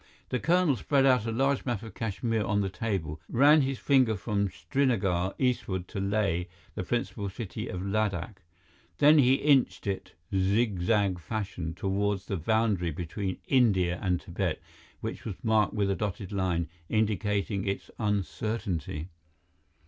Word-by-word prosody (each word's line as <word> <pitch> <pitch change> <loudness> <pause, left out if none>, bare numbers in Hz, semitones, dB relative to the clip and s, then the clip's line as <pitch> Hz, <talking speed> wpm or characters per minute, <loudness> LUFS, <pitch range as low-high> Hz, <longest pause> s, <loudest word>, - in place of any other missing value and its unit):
The 125 - 0
colonel 170 -2 +3
spread 135 +1 +2
a 125 -4 +3
large 135 +4 +1
map 120 -5 -2
of 110 -4 -9
Kashmir 110 +1 -1
on 105 0 +1
the 95 -1 -2
table, 90 -6 -3
ran 145 +5 +6
his 135 -1 -1
finger 130 -6 +3
from 100 -1 -1
Srinagar 95 - 0
eastward 100 -8 -1
to 100 - -4
Leh, 100 -3 0 0.3
the - - -3
principal 105 -1 -2
city 95 0 -6
of 90 0 -4
Ladakh. 100 -1 -1 0.6
Then 150 +1 +7
he 130 -1 +5
inched 140 -2 +2
it, 100 -1 -3 0.2
zig 100 +1 +2
zag 100 -1 +2
fashion, 90 -2 -4
toward 100 +1 0
the 100 0 -3
boundary 105 0 +1
between 90 +4 -4
India 95 -10 +3
and 90 -3 +1
Tibet, 90 -2 -2 0.4
which - - -5
was 105 - -4
marked 110 -2 +2
with 100 -2 +1
a - - +1
dotted 100 -1 -4
line, 90 -4 0 0.2
indicating 105 -2 0
its 100 - -3
uncertainty. 100 -5 -2
105 Hz, 145 wpm, -29 LUFS, 95-115 Hz, 0.6 s, Then